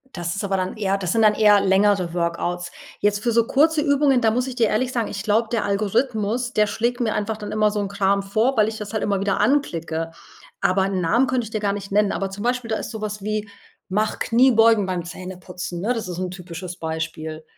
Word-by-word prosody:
Das 170 -1 -3
ist 200 - -4
aber 195 -1 0
dann 185 +2 -2
eher 195 -2 0
das 185 -3 -2
sind 225 -1 +2
dann 210 -1 +6
eher 210 -2 +5
längere 195 -2 +2
Workouts. 175 +1 -2 0.3
Jetzt 205 0 +1
für 235 - 0
so 230 -1 +3
kurze 310 +2 +3
Übungen, 285 -3 +3
da 220 -1 +3
muss 250 +3 0
ich 255 - -5
dir 230 -3 +3
ehrlich 250 +4 0
sagen, 230 -3 -1
ich 200 +1 -5
glaube, 220 +1 +1
der 230 - 0
Algorithmus, 220 +3 0
der 210 -1 +3
schlägt 240 +4 -1
mir 220 -2 +1
einfach 210 +1 -2
dann 210 -1 -7
immer 215 0 +2
so 210 0 -2
'n 195 - -3
Kram 200 0 +1
vor, 220 +7 +1
weil 215 0 +4
ich 220 - -7
das 210 +1 -7
halt 220 - -1
immer 200 -1 0
wieder 200 0 0
anklicke. 165 - 0 0.5
Aber 190 +1 +2
'n 190 -2 -1
Namen 235 +10 +2
könnte 255 -2 0
ich 220 - -10
dir 215 - -2
gar 200 -1 0
nicht 200 -1 -7
nennen. 205 0 +2
Aber, 195 -1 -2
zum 205 +2 -7
Beispiel, 245 -1 -1
da 220 - 0
ist - - -6
sowas 210 -2 -5
wie 215 0 -2 0.4
„Mach 210 +3 0
Kniebeugen 230 -4 +4
beim 180 -2 -2
Zähneputzen“, 180 0 -7
ne? 235 +5 +1
Das 225 -5 -4
ist 175 -1 -5
'n 185 -1 -3
typisches 180 -1 -8
Beispiel. 160 -1 -5
205 Hz, 235 wpm, -22 LUFS, 185-225 Hz, 0.5 s, dann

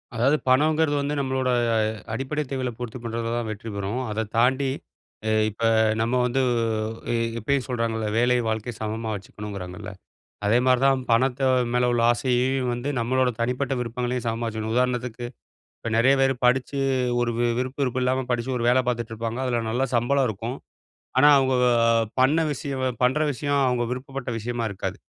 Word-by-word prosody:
அதாவது 135 +7 +3
பணம்ங்கறது 150 +3 +3
வந்து 145 +1 -2
நம்மளோட 130 -1 0 0.3
அ - - +3 0.3
அடிப்படை 135 +5 -2
தேவைகள 130 -2 -2
பூர்த்தி 120 0 -5
பண்றது 115 0 -3
தான் 120 -1 -2
வெற்றி 110 +2 -7
பெறும். 100 +5 -2
அதத் 105 0 -3
தாண்டி 130 +3 +3 0.6
எ - - +2 0.2
இப்ப 110 +2 -8 0.4
நம்ம 115 +2 0
வந்து 125 +2 0
உ - - +1 0.6
எ - - +1 0.2
எப்பயும் 135 +4 0
சொல்றாங்கல. 115 -3 -1
வேலையும், 120 0 +2
வாழ்க்கையும் 110 +1 -4
சமமா 110 +1 -3
வச்சுக்கனும்ங்கிறாங்கல. 100 -3 -7 0.5
அதே 110 +3 +4
மாரி 130 -1 +4
தான் 135 -1 +4
பணத்த 125 +3 +2 0.3
மேல 125 0 +2
உள்ள 120 -1 +1
ஆசையையும் 125 +1 0
வந்து 120 +4 -3
நம்மளோட 130 +2 +1
தனிப்பட்ட 125 +3 -1
விருப்பங்களையும், 125 +1 -3
சமமா 115 +1 -2
வெச்சிக்கணும். 110 0 -3
உதாரணத்துக்கு, 125 -1 -1 0.5
இப்ப 115 - -4
நிறைய 130 +4 +5
பேரு 135 0 +3
படிச்சு 130 +3 +1 0.4
ஒரு 120 -1 +1 0.3
விருப்பு 130 +3 -3
இருப்பு 130 0 -1
இல்லாம 130 +1 +1
படிச்சு 120 +2 -1
ஒரு 120 - -1
வேல 130 +1 +4
பாத்துட்டு 120 -2 -2
இருப்பாங்க. 115 +2 -4
அதுல 120 -2 0
நல்ல 125 +4 0
சம்பளம் 130 +3 +2
இருக்கும். 115 +5 -5 0.6
ஆனா 145 +3 +7
அவங்க 130 -1 +2 0.7
பண்ண 135 +5 +4
விஷயம் 135 -1 -4 0.2
பண்ற 130 +5 +2
விஷயம் 145 +1 0
அவங்க 125 -1 0
விருப்பப்பட்ட 130 0 -5
விஷயமா 120 +1 -3
இருக்காது. 100 - -5
125 Hz, 160 wpm, -24 LUFS, 115-130 Hz, 0.7 s, ஆனா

